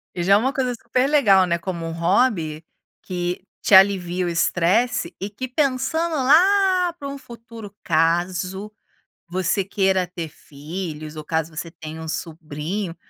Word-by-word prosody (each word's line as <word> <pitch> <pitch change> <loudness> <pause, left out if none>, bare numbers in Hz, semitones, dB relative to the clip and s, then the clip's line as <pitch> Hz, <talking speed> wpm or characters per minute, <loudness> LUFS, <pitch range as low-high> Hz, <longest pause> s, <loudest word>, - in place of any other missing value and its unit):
E 175 - -2
já 195 +2 +4
é - - +7
uma 260 +5 0
coisa 255 -4 -1
super 250 +3 0
legal 200 -11 +5
né, 170 0 +1
como 170 -1 -5
um - - -4
hobby 170 -3 +1 0.4
que 180 0 -4 0.2
te - - +1
alivia 185 -2 +5
o - - 0
estresse 180 +4 +1
e 195 - -3
que 235 +6 -6
pensando 280 +5 0
lá 360 +5 +4
para 285 -5 -8
um 280 0 -6
futuro, 230 -4 -11
caso 180 +5 0 0.6
você 185 +2 0
queira 190 -1 +1
ter 175 -2 -6
filhos 155 +1 -7
ou 155 - -7
caso 160 0 -2
você 165 +1 -5
tenha 160 0 -9
um 160 - -7
sobrinho, 165 +3 -5
185 Hz, 155 wpm, -22 LUFS, 170-245 Hz, 0.6 s, é